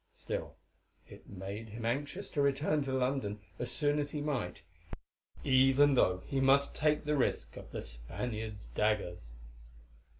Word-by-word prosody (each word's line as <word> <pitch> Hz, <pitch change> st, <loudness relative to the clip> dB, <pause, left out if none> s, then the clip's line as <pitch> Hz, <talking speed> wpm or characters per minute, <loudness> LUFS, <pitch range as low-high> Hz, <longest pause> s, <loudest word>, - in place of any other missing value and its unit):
Still -, -, -5 dB, 0.5 s
it -, -, -14 dB
made 100 Hz, +3 st, -6 dB
him 115 Hz, +2 st, -6 dB
anxious 145 Hz, -, -2 dB
to 145 Hz, -, +1 dB
return 145 Hz, +2 st, +2 dB
to 135 Hz, -, -2 dB
London 130 Hz, -5 st, 0 dB, 0.2 s
as 120 Hz, -, -2 dB
soon 145 Hz, +4 st, +2 dB
as 145 Hz, +1 st, -2 dB
might 135 Hz, -13 st, -2 dB, 0.8 s
he, -, -, -2 dB
even 135 Hz, +2 st, +6 dB
though 95 Hz, -7 st, +3 dB
he 135 Hz, -, -1 dB
must 135 Hz, +1 st, +4 dB
take 150 Hz, 0 st, +2 dB
the 150 Hz, 0 st, +1 dB
risk 135 Hz, -, 0 dB
of -, -, -9 dB
the -, -, -5 dB
Spaniards' 105 Hz, -, -5 dB
daggers. 90 Hz, -, -1 dB
130 Hz, 145 wpm, -33 LUFS, 105-145 Hz, 0.8 s, even